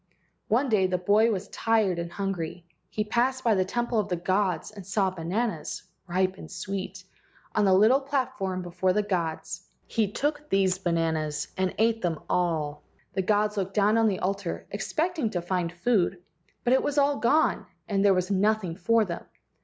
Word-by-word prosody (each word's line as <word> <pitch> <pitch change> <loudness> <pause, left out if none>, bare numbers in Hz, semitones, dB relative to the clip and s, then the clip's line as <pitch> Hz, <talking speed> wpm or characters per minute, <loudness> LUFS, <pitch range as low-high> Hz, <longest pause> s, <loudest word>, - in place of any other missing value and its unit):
One 250 +6 +2
day 205 -6 +3
the 185 0 0
boy 205 +5 +4
was 200 -2 -3
tired 215 -6 +1
and 170 0 -4
hungry. 175 -2 -4 0.2
He 215 - -1
passed 250 +4 0
by 230 - +4
the 190 -2 +3
temple 240 +4 -1
of 205 -1 -1
the 180 - +1
gods 185 -1 0
and 205 -2 -10
saw 195 0 0
bananas, 185 +1 -3 0.2
ripe 185 +2 0
and - - -9
sweet, 190 +1 -5 0.5
on 210 - +2
the 190 - +5
little 220 +8 +5
platform 260 -9 -2
before 180 +1 0
the 210 +2 +1
gods. 170 -3 -2 0.2
He 215 -4 0
took 295 +4 -2
these 190 -1 +2
bananas 160 -4 -1
and 185 -1 -1
ate 225 +1 +2
them 170 -3 -1
all. 155 -4 0 0.3
The 190 - 0
gods 210 +2 +1
looked 195 0 -2
down 210 +1 +4
on 225 -1 +4
the 195 -3 +1
altar 195 -2 -2
expecting 310 - -1
to 175 -4 -2
find 175 -1 -1
food, 185 0 +1 0.5
but 245 - +3
it 265 - +4
was 290 0 -2
all 285 0 +3
gone 290 +8 +2 0.2
and 200 -1 +1
there 200 -2 +5
was 185 +2 -1
nothing 200 -3 +1
for 225 +4 +3
them. 170 -3 -5
195 Hz, 180 wpm, -27 LUFS, 180-220 Hz, 0.5 s, the